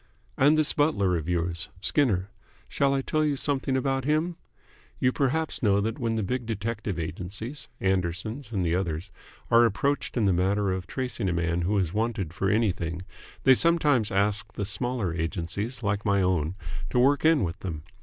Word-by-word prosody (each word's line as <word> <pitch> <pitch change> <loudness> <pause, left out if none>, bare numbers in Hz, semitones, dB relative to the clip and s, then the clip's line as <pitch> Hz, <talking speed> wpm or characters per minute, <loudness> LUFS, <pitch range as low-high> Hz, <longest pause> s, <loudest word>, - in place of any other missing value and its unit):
"And 145 +3 +4
this 155 -1 +3
butler 100 - +2
of 80 0 -3
yours 85 +2 -1
Skinner. 100 -3 +1 0.4
Shall 140 -1 +1
I 135 - 0
tell 155 +2 +1
you 150 -2 +1
something 135 -1 0
about 135 0 0
him? 155 +5 +1 0.6
You 125 - +2
perhaps 145 +4 0
know 100 -4 +3
that 110 +2 -2
when 115 -2 0
the 110 - 0
big 120 +4 -2
detective 110 -3 -3
agencies, 95 - -5
Anderson's 95 +7 -1
and 95 -5 0
the 85 - +1
others, 90 0 -2 0.4
are 115 0 +7
approached 125 +6 0
in 110 - +2
the 95 - +4
matter 95 +3 +1
of 95 -1 -3
tracing 125 -6 -2
a - - 0
man 85 0 0
who 100 +4 +1
is 90 -3 0
wanted 105 -6 -1
for 95 +2 0
anything 90 -5 0 0.4
they 135 - +7
sometimes 145 -7 +3
ask 100 0 0
the 100 - -3
smaller 115 -3 -2
agencies 90 +8 -3
like 100 0 0
my 100 -3 +2
own 90 -2 0 0.3
to - - -1
work 135 +3 +4
in 160 -6 +4
with 90 +2 -3
them. 80 -5 -5
105 Hz, 180 wpm, -27 LUFS, 90-130 Hz, 0.6 s, are